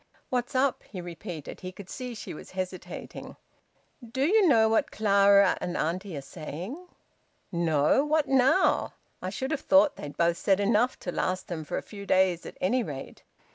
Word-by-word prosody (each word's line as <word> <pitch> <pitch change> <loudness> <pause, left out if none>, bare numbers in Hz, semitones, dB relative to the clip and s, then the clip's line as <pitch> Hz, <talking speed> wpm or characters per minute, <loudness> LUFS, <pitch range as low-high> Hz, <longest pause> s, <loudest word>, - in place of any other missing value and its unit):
"What's 250 +1 -1
up?" 265 +1 +2
he 190 - -7
repeated. 175 -2 -7
He 185 - -6
could 190 0 -11
see 250 +2 -6
she 210 - -7
was - - -10
hesitating. 185 0 -6 0.7
"Do 260 +4 -1
you 405 +3 +4
know 225 -7 +5
what 220 0 +2
Clara 200 -2 +4
and 175 - -3
auntie 175 +1 -2
are - - -4
saying?" 180 - -7 0.6
"No! 165 - +2
What 305 0 +1
now? 270 +7 +3 0.3
I 185 - -3
should 265 +8 -4
have 310 - -1
thought 290 +1 +4
they'd 145 -1 -8
both 170 0 +2
said 195 -1 +2
enough 220 +4 +2
to 175 - -3
last 185 +1 -2
them 165 -3 -4
for - - -4
a - - -4
few 200 -2 -10
days 185 -2 +2
at - - -10
any 245 +8 +1
rate." 145 - -7
200 Hz, 175 wpm, -28 LUFS, 175-255 Hz, 0.7 s, know